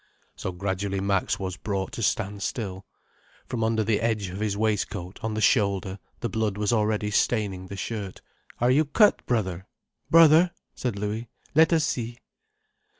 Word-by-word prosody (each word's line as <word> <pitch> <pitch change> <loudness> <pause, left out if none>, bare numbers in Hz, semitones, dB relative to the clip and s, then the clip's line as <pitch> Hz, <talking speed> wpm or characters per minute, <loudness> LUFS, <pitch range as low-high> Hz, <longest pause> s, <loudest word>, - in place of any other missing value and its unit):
So 95 - -4
gradually 95 +1 -2
Max 100 -1 0
was 95 -2 -4
brought 95 -1 -3
to - - -6
stand 100 -1 -1
still. 95 -4 -4 0.6
From 115 -3 -3
under 110 0 +1
the 105 0 +1
edge 110 -4 0
of 95 +2 -6
his 105 -2 -1
waistcoat, 105 -3 -2
on 110 -1 -2
the 110 - -1
shoulder, 100 -4 +2 0.2
the 120 - 0
blood 110 -2 -1
was 105 +1 +1
already 105 -1 +1
staining 100 -4 0
the 100 - -7
shirt. 100 -2 -5 0.4
"Are 120 +1 +3
you 145 +4 +4
cut, 205 +9 +4
brother, 95 -7 -1 0.4
brother?" 165 +1 +6 0.2
said 120 -5 -3
Louis. 105 +3 -3 0.2
"Let 160 +3 +5
us 160 -2 +3
see." 120 -3 -3
105 Hz, 160 wpm, -26 LUFS, 95-115 Hz, 0.6 s, brother